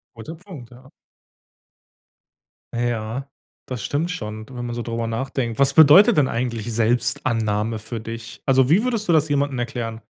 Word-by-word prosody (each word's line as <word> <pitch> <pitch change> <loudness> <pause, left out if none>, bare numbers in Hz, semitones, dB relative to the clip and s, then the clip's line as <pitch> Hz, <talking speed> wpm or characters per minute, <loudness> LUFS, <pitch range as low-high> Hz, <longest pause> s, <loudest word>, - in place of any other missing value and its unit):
Guter 135 +9 -8
Punkt, 160 - -12
ja. 130 +2 -16 1.8
Ja, 120 +2 -2 0.4
das 125 -4 -6
stimmt 155 - -1
schon, 110 -11 -6
wenn 120 -2 -6
man 120 - -4
so 120 - -4
drüber 115 0 -3
nachdenkt. 115 0 -3
Was 140 0 +4
bedeutet 170 - +7
denn 140 -3 +4
eigentlich 115 -1 -3
Selbstannahme 110 -1 0
für 110 +2 -6
dich? 115 +1 -8
Also, 130 -1 +3
wie 190 - +4
würdest 230 -5 -2
du 170 - +4
das 155 -1 +3
jemanden 140 -2 0
erklären? 115 -2 -4
120 Hz, 155 wpm, -22 LUFS, 115-140 Hz, 1.8 s, bedeutet